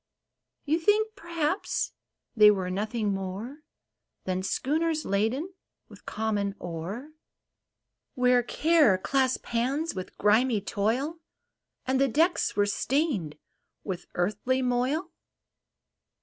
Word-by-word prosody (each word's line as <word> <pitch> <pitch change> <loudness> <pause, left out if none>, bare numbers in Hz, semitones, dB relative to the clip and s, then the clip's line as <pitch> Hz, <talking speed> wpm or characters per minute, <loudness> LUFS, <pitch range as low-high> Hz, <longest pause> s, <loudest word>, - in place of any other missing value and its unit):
You 310 +3 +1
think, 430 +5 +2
perhaps, 340 -1 -2 0.4
they 210 -2 +8
were 190 -3 0
nothing 210 +2 -1
more 195 +9 -5 0.6
Than 185 0 -1
schooners 310 - 0
laden 230 - 0 0.4
with - - -16
common 205 -2 -1
ore? 180 - -6 1.0
Where 250 -1 +4
Care 300 - +3
clasped 260 +6 0
hands 270 +8 0
with 185 -1 -7
grimy 220 +2 +3
Toil, 235 - -1 0.7
And 260 +1 +1
the 275 - +4
decks 325 +8 +1
were 205 - +3
stained 205 - -1 0.5
with 185 -2 -5
earthly 215 +8 0
moil 255 +7 0
245 Hz, 105 wpm, -27 LUFS, 200-300 Hz, 1.0 s, they